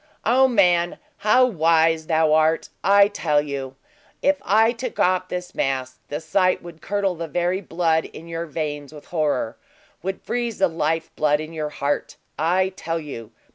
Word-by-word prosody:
O 260 Hz, +4 st, +5 dB
man, 180 Hz, -7 st, +3 dB, 0.2 s
how 235 Hz, +5 st, +4 dB
wise 165 Hz, -5 st, +2 dB
thou 160 Hz, -1 st, +3 dB
art! 160 Hz, +1 st, +2 dB
I 200 Hz, 0 st, +6 dB
tell 165 Hz, -8 st, +1 dB
you, 140 Hz, -2 st, -4 dB, 0.5 s
if 285 Hz, 0 st, +2 dB
I 220 Hz, +4 st, +4 dB
took 245 Hz, 0 st, -6 dB
off 185 Hz, 0 st, +2 dB
this 180 Hz, 0 st, -5 dB
mask, 130 Hz, -1 st, -2 dB
the 145 Hz, -, -4 dB
sight 185 Hz, +3 st, +1 dB
would 170 Hz, -2 st, -11 dB
curdle 200 Hz, 0 st, 0 dB
the 165 Hz, -1 st, -5 dB
very 175 Hz, +4 st, 0 dB
blood 165 Hz, -3 st, 0 dB
in 165 Hz, -, -11 dB
your 165 Hz, 0 st, -4 dB
veins 150 Hz, -2 st, -4 dB
with 150 Hz, -2 st, -12 dB
horror 150 Hz, -9 st, -1 dB, 0.4 s
would 190 Hz, +2 st, -4 dB
freeze 240 Hz, -2 st, -2 dB
the 190 Hz, -, +4 dB
lifeblood 160 Hz, -2 st, 0 dB
in 155 Hz, +1 st, -7 dB
your 155 Hz, -2 st, -3 dB
heart. 145 Hz, -1 st, -2 dB, 0.2 s
I 180 Hz, +4 st, +2 dB
tell 165 Hz, -3 st, -4 dB
you!" 120 Hz, -8 st, -8 dB
165 Hz, 165 wpm, -23 LUFS, 155-190 Hz, 0.5 s, I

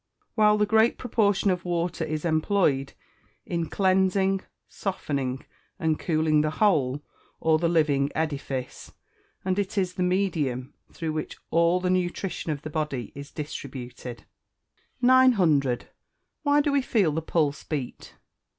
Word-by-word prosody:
while 210 Hz, -1 st, +4 dB
the 210 Hz, -, +3 dB
great 220 Hz, +2 st, +3 dB
proportion 205 Hz, -5 st, +1 dB
of 180 Hz, -1 st, -2 dB
water 175 Hz, -1 st, -1 dB
is 155 Hz, 0 st, -3 dB
employed 155 Hz, -4 st, +1 dB, 0.5 s
in 170 Hz, -2 st, -2 dB
cleansing, 190 Hz, 0 st, +2 dB, 0.3 s
softening, 140 Hz, -9 st, -3 dB, 0.3 s
and 160 Hz, -4 st, 0 dB
cooling 155 Hz, -2 st, +2 dB
the 155 Hz, -, +1 dB
whole, 145 Hz, -9 st, +2 dB, 0.4 s
or 160 Hz, -1 st, +3 dB
the 170 Hz, 0 st, +1 dB
living 145 Hz, -4 st, +2 dB
edifice, 140 Hz, -5 st, -4 dB, 0.5 s
and 185 Hz, +1 st, +1 dB
it 200 Hz, 0 st, -3 dB
is 185 Hz, -2 st, +1 dB
the 185 Hz, -, -4 dB
medium 165 Hz, -9 st, 0 dB, 0.2 s
through 160 Hz, -2 st, -4 dB
which 155 Hz, -1 st, -4 dB
all 170 Hz, +2 st, +3 dB
the 180 Hz, 0 st, 0 dB
nutrition 180 Hz, -1 st, -1 dB
of 145 Hz, 0 st, -4 dB
the 155 Hz, -, -5 dB
body 145 Hz, -7 st, -3 dB
is 140 Hz, +1 st, -9 dB
distributed. 125 Hz, -5 st, -7 dB, 0.8 s
900. 185 Hz, -, +4 dB, 0.5 s
_Why 290 Hz, 0 st, +4 dB
do 290 Hz, -, +1 dB
we 280 Hz, -1 st, +3 dB
feel 210 Hz, -10 st, +2 dB
the 160 Hz, +2 st, -2 dB
pulse 155 Hz, -3 st, 0 dB
beat? 140 Hz, -6 st, -5 dB
165 Hz, 135 wpm, -26 LUFS, 145-190 Hz, 0.8 s, while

